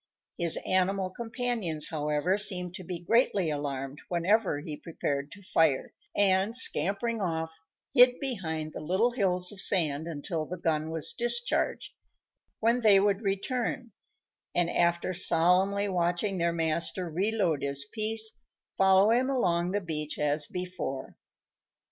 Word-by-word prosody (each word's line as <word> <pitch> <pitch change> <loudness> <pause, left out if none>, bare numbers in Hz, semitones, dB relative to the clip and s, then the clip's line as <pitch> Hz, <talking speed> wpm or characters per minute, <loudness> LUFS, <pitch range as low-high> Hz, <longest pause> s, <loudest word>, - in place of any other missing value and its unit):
His 170 -2 +4
animal 185 0 0
companions, 225 - -1
however, 150 +3 -1
seemed 180 -4 +2
to 185 - -8
be 180 0 -5
greatly 195 -3 +1
alarmed 140 -1 -5
whenever 180 -1 +1
he 150 0 -6
prepared 145 -3 -4
to 205 - -14
fire; 160 -7 +1 0.2
and, 195 +2 +2
scampering 230 -1 +2
off, 160 -2 -3 0.3
hid 250 -1 +6
behind 160 - -3
the - - -6
little 190 +10 0
hills 180 -6 0
of 200 -2 -9
sand 160 -4 +1
until 160 0 -4
the 180 - -6
gun 160 -2 -1
was 160 -2 0
discharged, 240 0 -1 0.7
when 235 +2 +1
they 205 -3 +5
would 200 +1 +1
return, 230 +4 -3 0.6
and, 175 -1 +1
after 170 +1 0
solemnly 185 +4 +4
watching 180 +1 -1
their 170 0 +1
master 170 +2 -2
reload 180 -2 -1
his 140 0 +1
piece, 220 +5 -1 0.3
follow 195 +2 +4
him 250 +3 +2
along 175 -10 0
the 205 +2 -1
beach 155 -4 -4
as 150 0 +1
before. 180 -7 -6
180 Hz, 135 wpm, -28 LUFS, 160-205 Hz, 0.7 s, hid